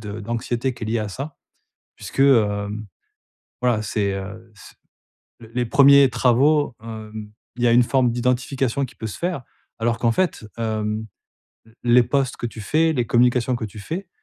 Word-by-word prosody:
d'anxiété 115 +4 -3
qui 110 - -7
est - - -5
liée 115 +1 0
à 105 - -3
ça, 140 +9 -7 0.6
puisque, - - -6
hem, 105 -5 +2 0.8
voilà, 120 -4 +2
c'est, 100 -1 -1
heu, 105 +4 -8
c - - -15 0.7
l 115 0 -13
les 125 -1 +1
premiers 140 +1 +6
travaux, 130 +4 +2
hem 110 -1 -8 0.3
il 120 - -2
y - - +5
a - - +4
une 120 0 +6
forme 125 -1 +2
d'identification 125 +2 0
qui - - -15
peut 110 - -5
se - - -7
faire 170 -7 -2 0.4
alors 115 0 0
qu'en 115 -2 +2
fait, 180 -12 -1
hem, 110 -1 -2 0.6
l 110 - -21 0.2
les 125 - +8
posts 135 +1 0
que 120 - -4
tu 115 -1 -8
fais, 160 +9 +2
les 120 -3 0
communications 125 +1 +2
que 115 - -5
tu 105 +1 -12
fais, 170 - -5
120 Hz, 175 wpm, -22 LUFS, 110-130 Hz, 0.8 s, les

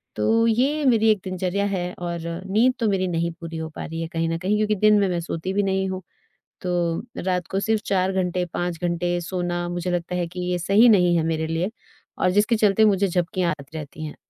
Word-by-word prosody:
तो 225 - +2
ये 270 +7 +2
मेरी 225 -4 +4
एक 210 - +1
दिनचर्या 185 +1 -1
है 180 -2 -2
और 170 -1 -3 0.3
नींद 240 +5 +4
तो 225 - +1
मेरी 190 -2 +1
नहीं 170 -1 -1
पूरी 165 -1 -6
हो 160 0 -4
पा - - -5
रही 165 +1 -5
है 165 - -3
कहीं 165 0 0
न 165 - -1
कहीं 195 +5 0
क्योंकि 215 0 +1
दिन 210 +1 +4
में 200 - +2
मैं 175 -1 -1
सोती 170 +2 -4
भी 205 +1 +1
नहीं 190 0 0
हूँ। 185 0 -4 0.6
तो 180 - -2 0.5
रात 180 -2 0
को 195 - 0
सिर्फ 220 +1 0
4 190 -1 +1
घंटे, 180 -1 0
5 175 -2 -2
घंटे 175 0 0
सोना 175 0 -2
मुझे 175 +1 -2
लगता 175 0 -2
है 175 -1 -1
कि 180 +2 -7
ये 180 - +1
सही 200 +7 +5
नहीं 180 -5 +5
है 160 - +1
मेरे 160 -1 -1
लिए 165 +5 -1 0.5
और - - +2
जिसके 210 +4 +3
चलते 215 0 +4
मुझे 200 -1 +3
झपकियाँ 180 0 0
आती 140 +3 -10
रहती 155 +1 -7
हैं। 150 - -7
180 Hz, 225 wpm, -23 LUFS, 170-200 Hz, 0.6 s, सही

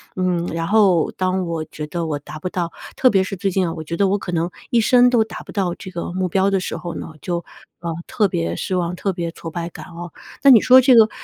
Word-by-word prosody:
嗯， 180 -2 0
然 165 0 -2
后 200 -6 +3
当 185 0 -1
我 165 -2 -2
觉 150 -1 -7
得 170 +1 -3
我 150 -2 -2
达 155 +1 -10
不 185 - -4
到， 175 -2 -3 0.2
特 255 - +4
别 195 -3 +3
是 195 0 -5
最 195 +2 -1
近 185 0 +1
啊， 165 - -3
我 160 - -6
觉 170 +2 -4
得 200 +1 +3
我 200 - +2
可 180 - -6
能 170 +1 0 0.2
一 235 - +3
生 245 +2 +5
都 235 -3 +3
达 - - -9
不 - - -11
到 185 -4 -1
这 185 - -9
个 170 -1 -5
目 185 0 -1
标 190 +2 +1
的 195 - +2
时 - - -4
候 175 -1 -6
呢， 160 - -7
就， 175 -2 -3 0.4
呃， 170 -1 -4
特 210 -3 +1
别 85 - -2
失 185 - -3
望、 180 0 -1
特 195 0 -1
别 170 -2 -3
挫 165 - -8
败 170 +1 -4
感 - - -10
哦。 175 -1 -9 0.3
那 275 - +8
你 230 - +9
说 255 +1 +7
这 255 0 +5
个 220 -1 +7
180 Hz, 290 characters per minute, -20 LUFS, 170-195 Hz, 0.4 s, 你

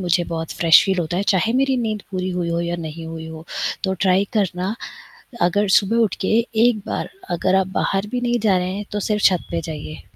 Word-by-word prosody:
मुझे 175 -1 +1
बहुत 165 -1 -4
fresh 165 -1 +7
feel 190 -2 0
होता 175 +1 -2
है 195 - +1
चाहे 225 +5 +2
मेरी 265 0 +2
नींद 215 -4 -2
पूरी 185 -1 -2
हुई 175 -1 -2
हो 170 0 0
या 170 0 -2
नहीं 160 +1 -7
हुई 160 0 -7
हो। 160 0 -9 0.4
तो 190 0 +1
ट्राई 190 +1 +4
करना, 190 0 0 0.7
अगर 205 +4 +2
सुबह 200 +3 +3
उठ 210 - +1
के - - -1 0.4
1 235 -3 +2
बार - - -3 0.2
अगर 180 +2 +1
आप 190 -1 +3
बाहर 195 +1 0
भी 250 - -1
नहीं 240 0 +1
जा 205 -3 +3
रहे 180 +1 -2
हैं 205 +1 -4
तो 210 - -1
सिर्फ़ 210 +1 -1
छत 180 -3 +4
पे 170 -1 -1
जाइए। 155 -1 -7
185 Hz, 225 wpm, -21 LUFS, 170-210 Hz, 0.7 s, fresh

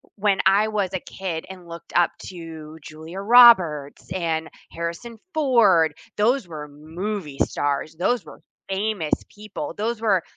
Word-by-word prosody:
when 200 -1 +1
I 200 +3 +5
was 205 -4 -1
a 190 - -1
kid 175 -4 -5
and 180 -2 -11
looked 170 0 -10
up 175 -1 +4 0.2
to 160 -3 -9
Julia 160 +5 -9
Roberts 190 - +5
and 160 -3 -2 0.2
Harrison 170 +8 -5 0.2
Ford, 210 - +4 0.2
those 235 +1 +2
were 150 -2 -7
movie 160 +1 -6
stars. 145 +2 -2
Those 190 +3 0
were 150 - -13 0.3
famous 195 -4 -1 0.2
people. 205 -7 -7
Those 225 +2 -2
were 195 -6 +2
180 Hz, 140 wpm, -23 LUFS, 160-210 Hz, 0.3 s, I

